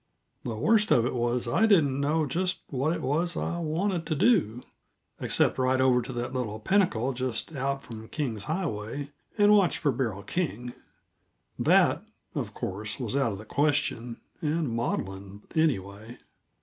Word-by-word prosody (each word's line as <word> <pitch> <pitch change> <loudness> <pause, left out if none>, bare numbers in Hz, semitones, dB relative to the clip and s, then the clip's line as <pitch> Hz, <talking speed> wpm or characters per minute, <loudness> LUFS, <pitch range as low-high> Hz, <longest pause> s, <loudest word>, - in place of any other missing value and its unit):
The 115 - -3
worst 215 - +3
of 120 - +4
it - - -1
was 120 0 0
that 120 - -3
I 225 - +4
didn't 145 -10 +3
know 155 +2 +1
just 185 +6 -1
what 140 +3 0
it 170 - -3
was 165 +6 0
I 170 - -2
wanted 170 +2 -1
to 155 - 0
do, 140 - +2 0.6
except - - +2
ride 130 0 +2
over 130 -1 +4
to 125 - -7
that 120 +1 -4
little 110 -5 -3
pinnacle 135 - +1
just 130 +4 -2
out 135 +1 -2
from 110 -1 -9
King's 115 -10 -3
Highway, 145 - -3 0.3
and 205 0 +6
watch 195 -4 +3
for 145 - +1
Beryl 115 -6 -2
King; 125 - -3 0.9
that, - - +4 0.3
of - - -4
course, 105 +4 -4
was 120 -1 -2
out 135 -6 +1
of - - -6
the 105 - -10
question, 125 -4 0 0.2
and 155 -1 0
maudlin, 100 -4 -4
anyway. 110 -7 -1
130 Hz, 160 wpm, -27 LUFS, 115-160 Hz, 0.9 s, and